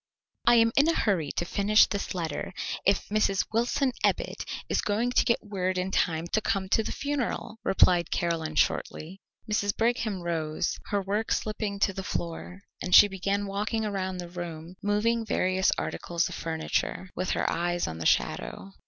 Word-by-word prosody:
"I 240 Hz, -, +7 dB
am 230 Hz, -1 st, +5 dB
in 285 Hz, +3 st, +5 dB
a 330 Hz, -, +3 dB
hurry 175 Hz, -9 st, +1 dB
to 175 Hz, -, -1 dB
finish 205 Hz, +3 st, +4 dB
this 200 Hz, -2 st, -4 dB
letter, 170 Hz, +1 st, -4 dB, 0.3 s
if 200 Hz, 0 st, +2 dB
Mrs. 205 Hz, -2 st, +2 dB
Wilson 245 Hz, +4 st, +1 dB
Ebbit -, -, 0 dB, 0.2 s
is -, -, +1 dB
going 225 Hz, +4 st, 0 dB
to -, -, +4 dB
get 235 Hz, -2 st, 0 dB
word 185 Hz, -2 st, -2 dB
in 185 Hz, +1 st, -1 dB
time 165 Hz, -3 st, +1 dB
to 215 Hz, -, +1 dB
come 195 Hz, -3 st, -1 dB
to 220 Hz, -, +3 dB
the -, -, -4 dB
funeral," 265 Hz, -5 st, -3 dB
replied 180 Hz, -4 st, +4 dB
Caroline 165 Hz, -2 st, -1 dB
shortly. 175 Hz, +6 st, -1 dB, 0.3 s
Mrs. 205 Hz, -1 st, 0 dB
Brigham 225 Hz, -5 st, 0 dB
rose, 160 Hz, -2 st, -2 dB
her 200 Hz, -1 st, 0 dB
work 205 Hz, +3 st, -2 dB
slipping 215 Hz, -1 st, -1 dB
to 195 Hz, -, +3 dB
the 190 Hz, -, -4 dB
floor, 180 Hz, +1 st, -5 dB, 0.2 s
and 180 Hz, -1 st, +3 dB
she 205 Hz, -, +10 dB
began 200 Hz, +1 st, -1 dB
walking 210 Hz, +3 st, -2 dB
around 190 Hz, -3 st, -2 dB
the 175 Hz, -1 st, -6 dB
room, 170 Hz, -1 st, -7 dB
moving 220 Hz, +3 st, +1 dB
various 190 Hz, -3 st, +1 dB
articles 170 Hz, -1 st, -2 dB
of -, -, -7 dB
furniture, 165 Hz, +3 st, -2 dB
with 185 Hz, +1 st, -2 dB
her -, -, 0 dB
eyes 175 Hz, +1 st, 0 dB
on 80 Hz, 0 st, -5 dB
the 80 Hz, -, 0 dB
shadow. 195 Hz, -, 0 dB
195 Hz, 175 wpm, -28 LUFS, 175-215 Hz, 0.3 s, she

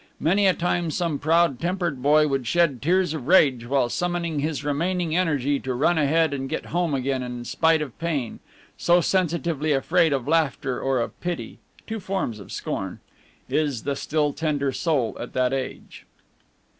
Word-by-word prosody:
Many 195 Hz, +5 st, +3 dB
a 185 Hz, -, +3 dB
time 175 Hz, -1 st, 0 dB
some 160 Hz, -3 st, -1 dB
proud 165 Hz, -3 st, +2 dB
tempered 175 Hz, -5 st, -2 dB
boy 150 Hz, +3 st, +4 dB
would 135 Hz, -4 st, -2 dB
shed 160 Hz, -3 st, +2 dB
tears 180 Hz, +1 st, +2 dB
of 145 Hz, -5 st, -6 dB
rage 135 Hz, -9 st, +4 dB
while 135 Hz, -1 st, +2 dB
summoning 170 Hz, +2 st, -2 dB
his 150 Hz, 0 st, -2 dB
remaining 165 Hz, +3 st, -1 dB
energy 145 Hz, -6 st, +1 dB
to 130 Hz, -1 st, -3 dB
run 160 Hz, +6 st, +2 dB
ahead 155 Hz, +1 st, +2 dB
and 135 Hz, -1 st, -4 dB
get 160 Hz, -, -3 dB
home 170 Hz, -4 st, +1 dB
again 130 Hz, 0 st, -1 dB
in 125 Hz, -1 st, -6 dB
spite 160 Hz, +3 st, +2 dB
of 135 Hz, -6 st, -9 dB
pain, 155 Hz, -8 st, -2 dB, 0.4 s
so 175 Hz, +1 st, +4 dB
sensitively 165 Hz, -4 st, 0 dB
afraid 165 Hz, +4 st, +2 dB
of 135 Hz, -3 st, -1 dB
laughter 145 Hz, -5 st, 0 dB
or 135 Hz, -1 st, +1 dB
of 115 Hz, -, -4 dB
pity 175 Hz, -1 st, -4 dB, 0.3 s
two 225 Hz, 0 st, -4 dB
forms 190 Hz, -, -3 dB
of 100 Hz, -, -11 dB
scorn -, -, -4 dB, 0.5 s
is 145 Hz, -7 st, -1 dB
the 140 Hz, 0 st, -1 dB
still 150 Hz, 0 st, 0 dB
tender 145 Hz, -4 st, -1 dB
soul 135 Hz, -6 st, 0 dB
at 120 Hz, -, -7 dB
that 130 Hz, 0 st, +1 dB
age. 135 Hz, -1 st, -6 dB
150 Hz, 170 wpm, -24 LUFS, 135-170 Hz, 0.5 s, boy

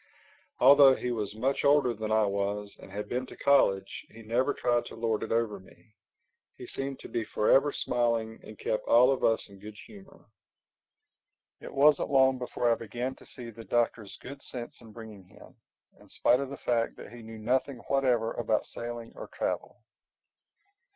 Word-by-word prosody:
Although 135 Hz, +1 st, +7 dB
he 125 Hz, -, -3 dB
was 105 Hz, -3 st, -3 dB
much 130 Hz, +5 st, -1 dB
older 140 Hz, -4 st, +4 dB
than 110 Hz, -1 st, -5 dB
I 110 Hz, 0 st, +4 dB
was 100 Hz, +1 st, -2 dB
and -, -, -13 dB
had 105 Hz, +1 st, -5 dB
been 125 Hz, +1 st, -3 dB
to -, -, -12 dB
college, 100 Hz, -9 st, +2 dB
he 115 Hz, +1 st, -13 dB
never 125 Hz, +6 st, +1 dB
tried 120 Hz, -3 st, 0 dB
to -, -, -10 dB
lord 115 Hz, -2 st, -1 dB
it -, -, -5 dB
over 115 Hz, -3 st, 0 dB
me. 100 Hz, +3 st, -21 dB, 0.6 s
He -, -, -9 dB
seemed 135 Hz, 0 st, -5 dB
to -, -, -9 dB
be 115 Hz, -, -2 dB
forever 135 Hz, +7 st, +3 dB
smiling 115 Hz, -4 st, -1 dB
and 110 Hz, -, -11 dB
kept 110 Hz, -, -2 dB
all 125 Hz, +3 st, +6 dB
of 135 Hz, -, -2 dB
us 115 Hz, -, +2 dB
in 100 Hz, -1 st, -15 dB
good 105 Hz, +1 st, -11 dB
humor. 195 Hz, -2 st, -16 dB, 1.3 s
It -, -, -9 dB
wasn't 145 Hz, +1 st, +4 dB
long 130 Hz, -1 st, +4 dB
before 120 Hz, -1 st, 0 dB
I -, -, +4 dB
began 120 Hz, +3 st, -4 dB
to -, -, -14 dB
see 120 Hz, -2 st, -8 dB
the 115 Hz, +1 st, -11 dB
Doctor's 115 Hz, -3 st, -1 dB
good 140 Hz, +2 st, -9 dB
sense 120 Hz, -1 st, -7 dB
in 115 Hz, -2 st, -14 dB
bringing 110 Hz, -4 st, -11 dB
him—in 90 Hz, -, -21 dB
spite 125 Hz, -, +2 dB
of 140 Hz, -1 st, -3 dB
the 140 Hz, -, -7 dB
fact 115 Hz, -1 st, -1 dB
that -, -, -11 dB
he 120 Hz, -, -10 dB
knew 110 Hz, 0 st, -10 dB
nothing 130 Hz, +4 st, -1 dB
whatever 125 Hz, -5 st, +1 dB
about 110 Hz, -2 st, 0 dB
sailing 120 Hz, -1 st, -7 dB
or -, -, -8 dB
travel. -, -, -4 dB
120 Hz, 180 wpm, -29 LUFS, 110-130 Hz, 1.3 s, Although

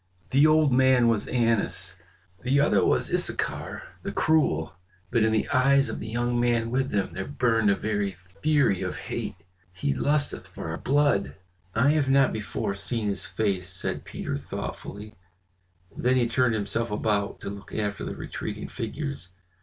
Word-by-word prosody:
The 140 Hz, +3 st, +6 dB
old 155 Hz, -3 st, +4 dB
man 130 Hz, -2 st, +5 dB
was 110 Hz, -3 st, 0 dB
Annas, 115 Hz, -6 st, 0 dB, 0.4 s
the 135 Hz, +3 st, +2 dB
other 145 Hz, -, +4 dB
was -, -, +1 dB
Issachar, -, -, -2 dB, 0.2 s
the -, -, -4 dB
cruel; 95 Hz, -, +2 dB, 0.4 s
but 115 Hz, -1 st, +3 dB
in 110 Hz, 0 st, +3 dB
the 110 Hz, -, +1 dB
eyes 135 Hz, +1 st, +4 dB
of -, -, -4 dB
the 110 Hz, -, -6 dB
young 120 Hz, +2 st, 0 dB
man 120 Hz, -1 st, +1 dB
with 135 Hz, +1 st, +1 dB
them 100 Hz, -4 st, -1 dB
there 95 Hz, +2 st, -4 dB
burned 115 Hz, -6 st, +2 dB
a 100 Hz, -, +4 dB
very 105 Hz, -2 st, -1 dB, 0.3 s
fury 145 Hz, -11 st, +3 dB
of 90 Hz, -1 st, -2 dB
hate. -, -, -4 dB, 0.4 s
He 85 Hz, -6 st, -1 dB
lusteth 145 Hz, -, 0 dB
for -, -, -7 dB
our 80 Hz, -, -4 dB
blood." 145 Hz, -7 st, +2 dB, 0.4 s
"I 130 Hz, +6 st, +4 dB
have 150 Hz, -3 st, +2 dB
not 135 Hz, 0 st, +4 dB
before 105 Hz, -2 st, -3 dB
seen 105 Hz, +2 st, -2 dB
his 100 Hz, -1 st, -3 dB
face," 95 Hz, -2 st, -1 dB
said 95 Hz, -, -3 dB
Peter -, -, -4 dB
thoughtfully; 105 Hz, +2 st, -7 dB, 0.8 s
then 125 Hz, +1 st, +2 dB
he 120 Hz, -2 st, +3 dB
turned 120 Hz, 0 st, +2 dB
himself 110 Hz, +3 st, -1 dB
about 105 Hz, -1 st, -1 dB
to -, -, -4 dB
look 100 Hz, 0 st, -10 dB
after 105 Hz, -1 st, -2 dB
the -, -, -4 dB
retreating 105 Hz, 0 st, -5 dB
figures. 135 Hz, -2 st, -5 dB
115 Hz, 165 wpm, -26 LUFS, 100-130 Hz, 0.8 s, The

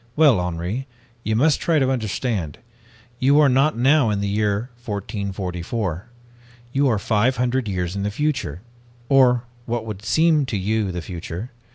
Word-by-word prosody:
'Well, 145 Hz, -10 st, +5 dB
Henri, 90 Hz, +9 st, -3 dB, 0.4 s
you 110 Hz, -, 0 dB
must 145 Hz, +6 st, +3 dB
try 165 Hz, -2 st, +2 dB
to 135 Hz, -2 st, +2 dB
understand. 110 Hz, -, -2 dB, 0.6 s
You 140 Hz, +3 st, +4 dB
are 150 Hz, -, +6 dB
not 135 Hz, +2 st, +3 dB
now 135 Hz, 0 st, +4 dB
in 105 Hz, -1 st, 0 dB
the 100 Hz, -, -1 dB
year 105 Hz, +3 st, -1 dB
1444. 100 Hz, -2 st, -4 dB, 0.7 s
You 140 Hz, +1 st, +3 dB
are 115 Hz, -4 st, +2 dB
five 110 Hz, +5 st, +1 dB
hundred 125 Hz, 0 st, 0 dB
years 90 Hz, -2 st, -2 dB
in 100 Hz, -, -2 dB
the 100 Hz, -, -1 dB
future, 135 Hz, -, -2 dB, 0.5 s
or 125 Hz, -3 st, +5 dB, 0.2 s
what 120 Hz, -1 st, -2 dB
would 105 Hz, -2 st, -7 dB
seem 150 Hz, +6 st, +3 dB
to 110 Hz, -, -2 dB
you 105 Hz, +1 st, 0 dB
the 90 Hz, -1 st, -5 dB
future. 90 Hz, +6 st, -6 dB
110 Hz, 160 wpm, -22 LUFS, 100-130 Hz, 0.7 s, are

